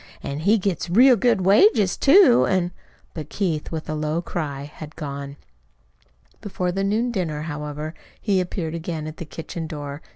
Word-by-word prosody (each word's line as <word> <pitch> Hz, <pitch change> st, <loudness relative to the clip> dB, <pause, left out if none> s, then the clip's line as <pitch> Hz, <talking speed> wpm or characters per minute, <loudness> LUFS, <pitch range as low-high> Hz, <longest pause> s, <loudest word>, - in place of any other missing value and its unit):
An' 140 Hz, +1 st, -4 dB
he 200 Hz, +8 st, +3 dB
gets 190 Hz, -4 st, -2 dB
real 250 Hz, +8 st, +6 dB
good 230 Hz, -2 st, +2 dB
wages, 200 Hz, -, +4 dB
too, 280 Hz, -4 st, +6 dB
an' 180 Hz, -2 st, +1 dB, 0.2 s
" -, -, -34 dB
But 155 Hz, -3 st, -7 dB
Keith 170 Hz, -7 st, -2 dB
with 160 Hz, -1 st, -5 dB
a 155 Hz, -, -3 dB
low 155 Hz, +1 st, -1 dB
cry 150 Hz, -5 st, -4 dB
had 150 Hz, +1 st, -10 dB
gone. 140 Hz, -1 st, -6 dB, 1.1 s
Before 185 Hz, -4 st, -2 dB
the 195 Hz, +2 st, -2 dB
noon 220 Hz, +5 st, 0 dB
dinner, 160 Hz, -8 st, -2 dB
however, 150 Hz, 0 st, -5 dB, 0.3 s
he 195 Hz, -4 st, +1 dB
appeared 175 Hz, -3 st, -4 dB
again 165 Hz, -2 st, -4 dB
at 155 Hz, 0 st, -7 dB
the 170 Hz, -, -6 dB
kitchen 165 Hz, +1 st, -6 dB
door. 145 Hz, -2 st, -6 dB
170 Hz, 170 wpm, -23 LUFS, 150-195 Hz, 1.1 s, real